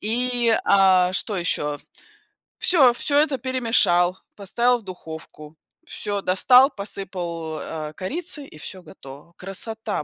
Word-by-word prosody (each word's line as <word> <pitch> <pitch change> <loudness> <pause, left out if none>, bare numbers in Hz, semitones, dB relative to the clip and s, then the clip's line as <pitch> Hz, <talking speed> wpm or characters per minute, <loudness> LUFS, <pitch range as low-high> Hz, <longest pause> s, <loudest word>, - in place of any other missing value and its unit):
И, 240 +2 0
э, 185 -2 +4
что 205 +1 -2
еще? 150 -4 -1 0.8
Всё, 275 -9 +5
всё 285 +4 -1
это 295 -3 +1
перемешал, 225 -8 +2 0.2
поставил 240 +5 +1
в 225 - -19
духовку, 160 -4 -10 0.3
всё 205 -1 -4
достал, 250 +9 +5
посыпал, 175 -5 -5
э, 155 -1 -6
корицей 300 - -4
и - - -15
все 185 +4 -9
готово. 145 -1 -14
Красота, 210 +1 -5
195 Hz, 120 wpm, -22 LUFS, 175-245 Hz, 0.8 s, Всё